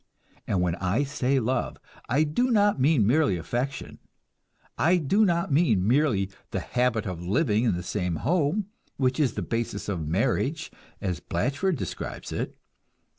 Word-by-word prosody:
And 95 -3 +1
when 90 -2 +1
I 100 +9 0
say 135 -1 0
love, 125 +2 -1 0.3
I 140 +6 +3
do 155 +13 +1
not 205 - +3
mean 135 -4 +4
merely 130 - +3
affection. 120 - -4 0.8
I 175 +4 +3
do 180 +7 +2
not 170 -4 +1
mean 120 - +3
merely 120 -7 +2 0.2
the - - -2
habit 125 -2 0
of 90 -4 -4
living 110 - +1
in 110 - +2
the 90 - -4
same 90 -2 -2
home, 170 - +1 0.3
which 130 0 +1
is 135 -7 +2
the - - -2
basis 115 -3 -3
of 85 -7 -3
marriage 130 - 0 0.3
as 90 -6 -2
Blatchford 150 +8 -1
describes - - -6
it. - - -3
130 Hz, 155 wpm, -26 LUFS, 100-155 Hz, 0.8 s, mean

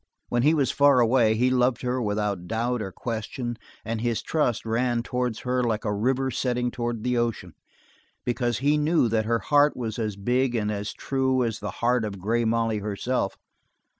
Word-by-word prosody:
When 120 - +1
he 150 +5 +4
was 140 -4 +2
far 140 -2 +5
away 115 -2 +4
he 125 +3 +2
loved 125 0 +2
her 125 0 -1
without 105 -4 -2
doubt 120 +3 -1
or 95 -2 -4
question 120 +3 -4 0.3
and 115 0 -3
his 120 -1 -1
trust 125 -9 0
ran 120 +1 0
towards 125 -2 -2
her 125 0 0
like 115 -1 -1
a 105 - 0
river 130 +5 0
setting 125 -1 -1
towards 120 -2 -3
the 125 -1 +1
ocean 120 -2 -2 0.7
because 120 -1 0
he 145 +3 +2
knew 155 -3 +3
that 110 -1 +1
her 115 +1 +2
heart 145 +7 +3
was 115 -2 -4
as 110 -3 -2
big 125 +5 0
and 105 -2 0
as 105 0 -3
true 130 -1 0
as 115 -3 -2
the 105 - -4 0.2
heart 125 -1 +3
of 105 -2 -4
Grey 115 +5 0
Molly 115 -1 +1
herself. 105 +2 -2
120 Hz, 190 wpm, -25 LUFS, 110-125 Hz, 0.7 s, far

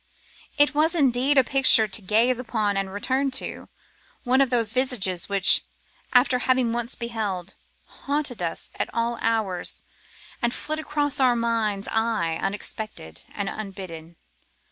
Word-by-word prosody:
It 290 +1 +4
was 315 +3 +2
indeed 270 -1 +2
a 265 - +7
picture 260 -4 +5
to 210 +2 -2
gaze 230 +5 +2
upon 220 -4 -1
and 195 0 -1
to - - -11
return 260 +7 -1
to; - - -7 0.5
one 260 +2 +3
of 270 - +2
those 230 -3 +2
visages 215 -10 +1
which, 200 -1 +5 0.5
after 250 0 +4
having 255 -2 +1
once 240 +1 -3
beheld, 210 -6 -4 0.3
haunt 280 -6 -4
us 170 -1 -3
at - - -1
all 235 0 -1
hours 220 -5 -1 0.6
and 235 -1 0
flit 310 +1 -2
across 295 -2 0
our 255 -2 +4
mind's 225 -4 -1
eye 220 -8 0
unexpected 200 - -5
and 200 -1 -3
unbidden. 185 -6 -8
230 Hz, 145 wpm, -24 LUFS, 200-255 Hz, 0.6 s, a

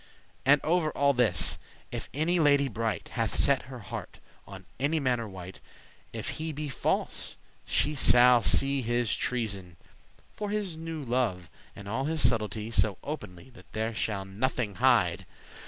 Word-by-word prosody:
And 145 +2 +7
over 165 0 +2
all 140 -1 +2
this, 120 - +2 0.3
if - - -5
any 165 +5 +1
lady 145 -2 +4
bright 110 -5 -3
Hath - - -2
set 140 -1 +3
her 130 - -7
heart 100 - -7 0.3
on 95 -1 -10
any 150 +4 +1
manner 125 -5 0
wight, 95 -1 -10 0.5
If - - -5
he 160 0 -2
be 150 0 -5
false, 135 - -1 0.3
she 150 - +1
shall 125 -3 +6
his 120 -2 +2
treason 100 -8 -3 0.6
see, 210 - -2
His 205 -4 -2
newe 160 -1 -5
love, 115 - -1 0.2
and 100 - -10
all 130 +6 -2
his 155 -4 +3
subtlety, 110 -1 -2
So 100 -2 +2
openly 130 - -7
that 120 - -17
there 110 +1 -1
shall 105 -3 -2
nothing 110 +2 -2
hide. 115 -10 +3
125 Hz, 150 wpm, -29 LUFS, 105-145 Hz, 0.6 s, And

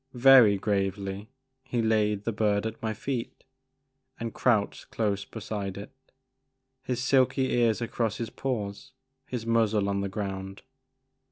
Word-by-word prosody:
Very 125 -5 +7
gravely 100 0 -2 0.3
he 120 - -3
laid 105 -2 +1
the 115 - -1
bird 105 -1 +1
at 110 0 -5
my 110 - -1
feet 120 +2 -4 0.8
and 115 -1 -4
crouched 110 -5 0
close 100 -3 -1
beside 100 -3 -5
it, 100 +6 -8 0.9
his 125 -2 -3
silky 130 0 +2
ears 120 -2 +2
across 115 -2 -1
his 115 - -4
paws, 120 -1 -4 0.3
his 120 -3 -4
muzzle 110 -3 +2
on 100 0 0
the 100 - -2
ground. 95 -1 -5
110 Hz, 135 wpm, -28 LUFS, 100-120 Hz, 0.9 s, Very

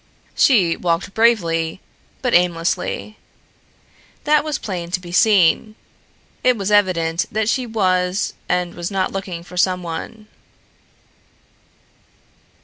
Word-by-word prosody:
She 190 -11 +3
walked 170 +2 -2
bravely, 170 -8 +1 0.4
but 250 - 0
aimlessly. 180 +4 0 1.0
That 300 0 +3
was 305 -2 -2
plain 175 -4 -5
to 180 - -1
be 175 -1 -11
seen. 210 +1 +3 0.7
It 250 -2 +3
was 200 0 -2
evident 180 -5 +2
that 220 0 -1
she 250 +1 0
was 185 -3 0 0.2
and 180 -1 0
was 175 0 -5
not 195 -2 -1
looking 185 -3 -5
for 180 +1 -12
someone. 180 +4 -2
185 Hz, 110 wpm, -20 LUFS, 175-215 Hz, 1.0 s, She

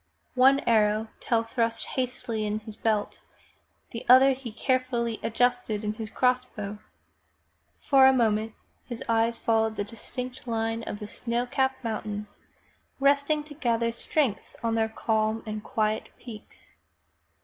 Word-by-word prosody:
One 265 +2 +5
arrow 215 -1 +2
Tell 230 -1 +1
thrust 230 0 -1
hastily 250 -3 -2
into 210 0 -3
his 220 - -7
belt, 215 -2 -1 0.7
the 230 - -6
other 260 +2 +8
he 260 -3 -5
carefully 240 -1 -1
adjusted 245 -2 0
in 210 0 -1
his 215 0 -6
cross 250 +2 +2
bow. 210 -4 -7 1.0
For 270 -1 +6
a - - +7
moment 220 -3 +1 0.3
his 240 -2 -6
eyes 230 0 +2
followed 220 -1 +1
the 205 - -1
distant 250 +4 -7
line 225 0 -1
of 205 - -5
the 210 - -7
snow 235 +3 -2
capped 265 +1 -1
mountains, 210 -2 -5 0.6
resting 280 +2 +3
to 300 0 -12
gather 235 -5 0
strength 245 0 -1
on 230 -1 +1
their 225 -1 +1
calm 220 0 0
and 215 -1 -5
quiet 215 -3 -1
peaks. 225 -4 -12
230 Hz, 140 wpm, -27 LUFS, 220-255 Hz, 1.0 s, other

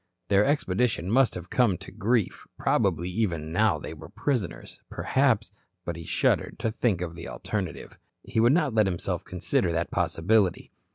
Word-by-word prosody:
Their 100 +1 +5
expedition 110 - 0
must 130 +1 +4
have 90 0 -8
come 115 -8 +3
to - - -11
grief, 115 0 0
probably 85 -3 +1
even 90 -6 -2
now 100 -1 +3
they 75 - -7
were 80 0 -11
prisoners, 115 - -3
perhaps 125 -6 +1 0.3
But 85 - -3
he 85 0 -8
shuddered - - +1
to 115 -1 -1
think 110 -5 0
of 85 -2 -4
the 85 0 -8
alternative. 95 -5 -5 0.2
He - - -2
would 120 +2 +5
not 150 -6 +2
let 110 -2 +4
himself 90 -3 -2
consider 90 0 0
that 85 +1 -1
possibility. 90 +3 +1
100 Hz, 165 wpm, -27 LUFS, 85-115 Hz, 0.3 s, Their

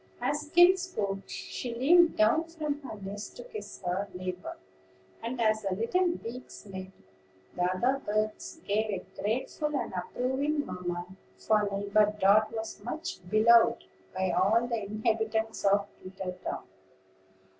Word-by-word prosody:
As 295 +1 -1
Skim 350 +4 +7
spoke, 205 - -3
she 240 -2 -5
leaned 335 +7 +5
down 230 +10 +4
from 305 -3 -4
her 265 -6 -7
nest 200 - -7
to - - -7
kiss 480 -3 -9
her 185 +3 -1
neighbor; 185 0 -5 0.6
and, 240 +2 -4
as 215 -1 +3
the 195 -3 -1
little 295 - +1
beaks 245 +1 -9
met, 190 -2 -7 0.7
the - - -3
other 245 +10 +1
birds 215 +9 -2
gave 215 +2 +1
a 195 -3 -3 0.2
grateful 260 +7 -1
and - - -4
approving 265 +10 -1
murmur, 175 -3 -4 0.3
for 210 -2 +2
Neighbor 205 +1 +2
Dart 210 +2 +5
was 225 0 -6
much 325 - -4
beloved 230 +2 +5 0.3
by 190 -1 +1
all 210 +7 +3
the 235 -2 -2
inhabitants 220 +1 -1
of 200 0 +4 0.2
Twittertown. 185 -1 -5
220 Hz, 135 wpm, -29 LUFS, 195-265 Hz, 0.7 s, Skim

